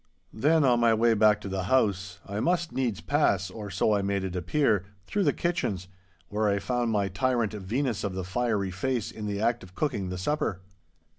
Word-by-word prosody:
Then, 150 +7 +3
on 125 -3 +4
my 115 -1 +4
way 115 +1 +4
back 105 -1 +4
to 105 - -6
the 95 -1 -2
house, 100 -6 +1
I 100 +1 -4
must 170 +5 +1
needs 120 -6 -1
pass—or 105 - 0
so 95 +3 +1
I 100 - +2
made 100 0 -1
it 95 -1 -4
appear—through 100 - 0
the - - +4
kitchens, 135 - -2 0.4
where 105 +1 0
I 100 - +2
found 120 +3 -1
my 105 -3 +1
tyrant 115 +2 0
Venus 110 +4 -2
of 100 -3 -2
the 95 - -3
fiery 100 0 -1
face 120 +4 -2
in 105 -1 -6
the 100 -1 -2
act 115 +2 +1
of 90 -1 -14
cooking 105 -11 -1
the 90 - -4
supper. 95 - -1
105 Hz, 195 wpm, -27 LUFS, 95-125 Hz, 0.4 s, on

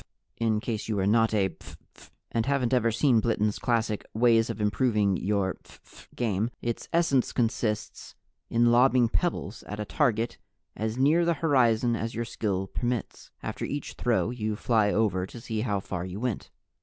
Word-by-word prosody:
In 110 -2 +1
case 110 -2 -4
you 110 -2 -1
are 95 - +1
not 115 +2 +3
a 100 -3 +2
phph 85 - -13 0.2
fan, - - -18 0.2
and 115 -1 0
haven't 135 -3 +1
ever 120 -2 +3
seen 120 0 +3
Bliten's 105 -2 0
classic 115 -3 0
Ways 115 0 +4
of 115 - -4
Improving 105 -2 +2
Your 95 0 -1
Phph - - -18
Game, 110 -2 0
its 120 -1 -4
essence 165 -7 +2
consists 110 -3 -2 0.3
in 120 0 +3
lobbing 125 0 +4
pebbles 165 - -2
at 105 - -6
a 105 - -2
target 120 -5 0 0.4
as 110 +2 -3
near 150 +6 +4
the 170 0 +2
horizon 125 -6 +2
as 115 0 -4
your 115 +1 -2
skill 100 -4 -2
permits. 120 +4 -4
After - - -4
each 145 0 -4
throw, 120 -1 0
you 110 -3 -2
fly 110 -1 +2
over 100 -4 +1
to 120 - -10
see 110 -1 -3
how 105 -4 0
far 95 -2 -5
you 95 +2 -6
went. 125 -3 -3
115 Hz, 175 wpm, -27 LUFS, 105-120 Hz, 0.4 s, Ways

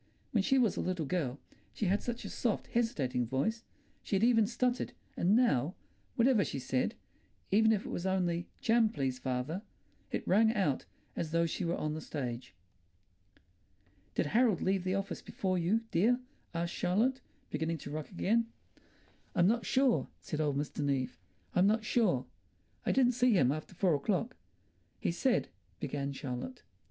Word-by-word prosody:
When 215 - +3
she 270 +7 +3
was 235 -6 +3
a - - 0
little 180 -4 -1
girl 140 -4 -1 0.4
she 215 - -1
had 195 +3 +2
such 240 -1 -4
a - - -4
soft, 230 -4 -1
hesitating 135 - 0
voice; 220 - -1 0.4
she - - -2
had 195 - +2
even 230 -3 +5
stuttered, 250 +1 0 0.2
and 185 +5 +3
now, 175 - +3 0.4
whatever 235 -3 +4
she - - -4
said—even 160 - -1
if 210 -2 +1
it - - -5
was 175 - -2
only 175 -2 0
"Jam, 225 -1 +4
please, 135 - -2
father"—it 130 - -5
rang 220 +4 +4
out 150 - +1 0.3
as 165 - -2
though 170 +1 +2
she 165 - -2
were 170 0 0
on 155 0 -2
the 155 - -4
stage. 125 - -5 1.6
"Did - - +2
Harold 220 - +3
leave 190 -1 +1
the 185 +1 +1
office 195 0 -3
before 185 -2 -1
you, 190 +7 +2
dear?" 230 +9 +3 0.3
asked 170 0 -2
Charlotte, 230 +9 +1 0.3
beginning 160 +1 -1
to 145 - -8
rock 155 0 -4
again. 225 +5 +1 0.9
"I'm 175 -3 +4
not 225 +1 +2
sure," 260 -2 +3
said 155 -1 -3
Old 145 -2 +1
Mr. 145 +1 -3
Neave. 135 -3 0 0.4
"I'm 180 +2 +4
not 215 +1 +2
sure. 190 - +2 0.6
I - - +4
didn't 255 -2 +4
see 250 0 +3
him 135 -10 +4
after 155 +5 -5
four 180 -1 +3
o'clock." 210 - 0 0.6
"He - - 0
said—" 240 +8 +1 0.3
began 140 0 -2
Charlotte. 140 - -5
185 Hz, 165 wpm, -32 LUFS, 150-225 Hz, 1.6 s, even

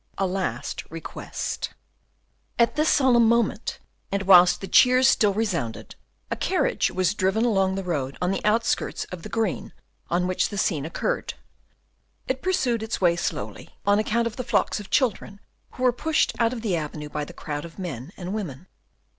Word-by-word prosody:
A 195 - +1
Last 180 -10 -3
Request 165 0 -5 0.8
At 235 +2 +3
this 305 +1 +2
solemn 245 -4 +5
moment, 230 -1 +1 0.3
and 200 0 0
whilst 180 -2 +7
the 195 - -6
cheers 255 +4 +6
still 210 -5 +4
resounded, 175 - -2 0.4
a - - +1
carriage - - +1
was 185 0 +1
driving 205 +3 +1
along 195 -4 +2
the 195 - -3
road 140 -7 -2
on 180 +1 0
the 195 - -2
outskirts 220 +2 +1
of 180 -2 -6
the - - -8
green 220 -5 -2 0.4
on 175 +1 +1
which 185 0 0
the 205 - -6
scene 160 -7 0
occurred; - - -2 0.9
it 260 0 -2
pursued 255 -11 +1
its 220 0 -3
way 175 -2 +4
slowly, 105 - -5
on 205 +1 +4
account 230 +2 +1
of 230 - -4
the 255 - -2
flocks - - +1
of 205 - -10
children 210 -5 0 0.3
who 255 - -6
were 250 -1 +4
pushed 310 +5 +1
out 230 -1 +3
of 240 -3 -6
the 200 -6 +1
avenue 150 -1 -5
by 150 0 -3
the - - -8
crowd 145 -1 -5
of 170 -1 -11
men 160 - -6
and 185 +1 -5
women. 180 -7 -5
195 Hz, 180 wpm, -25 LUFS, 170-230 Hz, 0.9 s, whilst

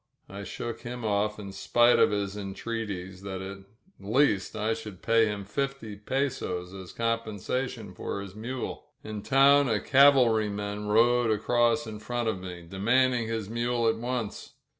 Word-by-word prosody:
I 100 +1 -7
shook 115 +3 -5
him 120 -1 -6
off 105 0 0
in 100 -2 -7
spite 120 +5 +3
of - - +6
his 100 -1 -2
entreaties 95 -2 -5
that 95 -1 -5
at 95 +1 -7 0.4
least 105 0 +1
I 110 +1 0
should 110 -4 -9
pay 115 -1 +4
him 105 -1 -4
fifty 135 -1 -3
pesos 100 -6 -2
as 95 -2 -9
compen 115 -2 -1
sation 115 -2 -4
for 100 - -4
his 100 -1 -8
mule. 120 +4 -5 0.2
In 110 -1 -6
town 140 +2 +5
a 110 -2 +2
cavalryman 110 -7 +3
rode 120 +2 +4
across 120 +6 +2
in 105 -1 -7
front 120 +1 -2
of 105 - -2
me, 90 -2 -8
demanding 120 +5 +2
his 110 -3 -3
mule 120 +1 0
at 115 0 +2
once. 120 -2 -4
110 Hz, 160 wpm, -28 LUFS, 100-120 Hz, 0.4 s, of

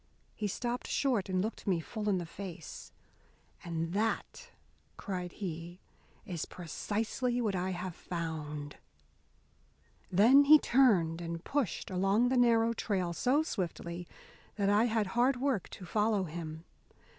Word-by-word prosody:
He 210 - -2
stopped 240 +5 -3
short 240 -9 +1
and 185 0 +1
looked 220 0 -5
me 180 -4 +2
full 210 +5 -3
in 195 - +2
the 175 - -3
face. 175 -2 -8 0.7
"And 165 0 -3
that," 225 - -2 0.5
cried 180 -3 -4
he, 175 -2 -6 0.5
"is 170 -4 -4
precisely 220 - -2
what 215 -5 0
I 185 +1 -1
have 180 0 -4
found!" 155 -4 -5 1.3
Then 240 +10 +7
he 305 +2 +10
turned 195 - +3
and 170 0 -5
pushed 275 - -2
along 195 +6 +3
the 260 - +1
narrow 230 -1 +4
trail 185 -6 -1
so 260 - +2
swiftly 175 - -4 0.5
that 200 -1 +2
I 210 +3 +4
had 225 -2 +1
hard 245 +2 +3
work 265 -7 0
to 185 - -9
follow 210 +1 +1
him. 160 -1 -6
195 Hz, 135 wpm, -32 LUFS, 170-230 Hz, 1.3 s, he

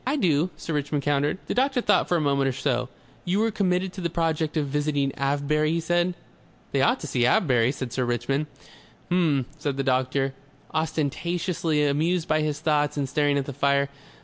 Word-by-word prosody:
"I 265 +3 0
do," 175 - +2
Sir 165 - -5
Richmond 145 -1 -1
countered. 145 +3 +1
The - - -2
doctor 265 +1 +2
thought 205 -5 +2
for 175 - +2
a - - 0
moment 140 -2 +2
or - - +2
so. 125 -2 -1 0.3
"You 195 +5 +1
are 225 - +1
committed 185 -2 0
to 190 - -7
the 170 - -1
project 160 -1 -1
of 150 - +1
visiting 145 -1 0
Avebury?" 145 +3 0
he 170 - +1
said. 175 +2 +1 0.6
"They - - +1
ought - - +3
to - - -5
see 120 - 0
Avebury," 125 -4 +3
said 130 -3 -6
Sir 130 - 0
Richmond. 120 +5 -1 0.6
"H'm," 160 -7 +2
said 145 -2 -2
the 135 - 0
doctor, 130 +1 +1 0.4
ostentatiously 160 +1 0
amused 160 +4 +1
by 155 -2 +2
his 150 0 -2
thoughts 150 -2 +1
and 140 -2 0
staring 145 +1 +1
at 140 - -1
the 140 - -6
fire. 140 +1 +2
150 Hz, 195 wpm, -25 LUFS, 140-170 Hz, 0.6 s, ought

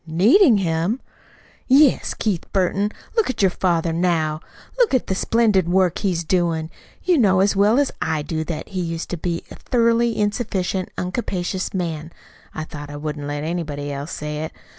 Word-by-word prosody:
"Needing 225 - +5
him!" 175 +5 0 0.7
"Yes. 275 +1 +4
Keith 200 -6 -2
Burton, 195 +2 +1 0.2
look 450 - +2
at 255 - -1
your 190 - +4
father 170 -2 0
now. 165 -3 +1 0.4
Look 475 - +4
at 255 - +1
the - - -1
splendid 205 -3 +2
work 185 -2 +2
he's 180 -4 0
doin'. 165 -2 0 0.3
You 355 -5 +3
know 190 -5 +4
as 195 +1 +3
well 205 +4 +4
as 285 -1 +2
I 155 -2 -1
do 160 +1 -2
that 165 -2 -5
he 185 -2 -3
used 165 -1 -4
to 175 - -2
be 170 +1 -3
a - - -8
thoroughly 235 -1 +1
insufficient, 200 -3 -1
uncapacious 185 -1 -2
man 165 -4 -3 0.4
(though 155 -1 -6
I 145 - -7
wouldn't 145 -1 -5
let 145 0 -3
anybody 150 -4 -3
else 140 +3 -5
say 150 0 -4
it!) 160 - -5
180 Hz, 170 wpm, -21 LUFS, 160-210 Hz, 0.7 s, Needing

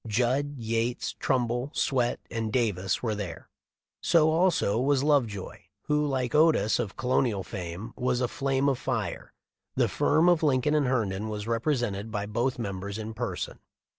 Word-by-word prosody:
Judd, 130 +6 0
Yates, 115 +1 -1
Trumbull, 125 0 0
Swett, 125 -3 +1
and 115 -2 -2
Davis 100 -6 0
were 110 -3 0
there; 95 -6 -6 0.5
so 160 -2 +4
also 160 - +2
was 135 +1 +2
Love 145 -5 +4
joy, 100 -3 -8 0.2
who, 150 0 +1
like 130 -3 -1
Otis 150 -9 +4
of 100 - -3
colonial 125 -5 +1
fame, 90 +4 -6
was 125 -1 0
a 125 - +1
flame 135 +2 0
of 135 -3 +1
fire. - - -3 0.4
The - - +3
firm 160 +4 +2
of 175 -2 +4
Lincoln 145 -1 +2
and 150 -3 +2
Herndon 110 -4 -1
was 105 -1 -4
rep 115 +4 -1
resented 115 -7 0
by 105 -2 -3
both 120 +5 -1
members 100 -2 -4
in 110 0 -5
person. 120 +3 -4
120 Hz, 165 wpm, -28 LUFS, 105-135 Hz, 0.5 s, so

